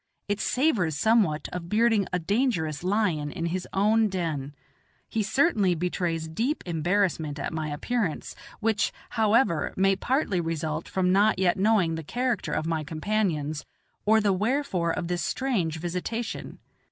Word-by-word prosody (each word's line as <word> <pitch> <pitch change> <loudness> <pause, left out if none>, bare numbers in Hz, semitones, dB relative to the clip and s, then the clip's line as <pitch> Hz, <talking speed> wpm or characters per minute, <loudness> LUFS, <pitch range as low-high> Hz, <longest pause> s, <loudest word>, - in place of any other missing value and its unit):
It 205 0 -1
savors 215 - +1
somewhat 195 -5 +2
of 175 -1 -5
bearding 220 -1 +3
a 180 - +1
dangerous 180 - 0
lion 180 -7 +1
in 165 - -4
his 180 +2 -2
own 215 +3 +3
den. 155 -7 -3 0.5
He 225 - -1
certainly 210 - +2
betrays 170 -1 -2
deep 230 - -1
embarrassment 170 -3 0
at 140 - -4
my 155 -1 -2
appearance; 165 +4 -2 0.2
which, 220 -1 +1 0.2
however, 220 -6 +2
may 195 +1 +4
partly 210 - 0
result 160 -1 -3
from 185 -1 +1
not 205 +3 +4
yet 185 -2 +3
knowing 195 -4 +3
the 160 0 -4
character 245 - -1
of - - -1
my 160 -1 -1
companions, 155 -2 -1 0.4
or 220 +1 +5
the 205 -2 +2
wherefore 210 -4 0
of 170 - -3
this 175 0 -1
strange 195 - -1
visitation. 180 +7 -4
185 Hz, 145 wpm, -27 LUFS, 160-220 Hz, 0.5 s, or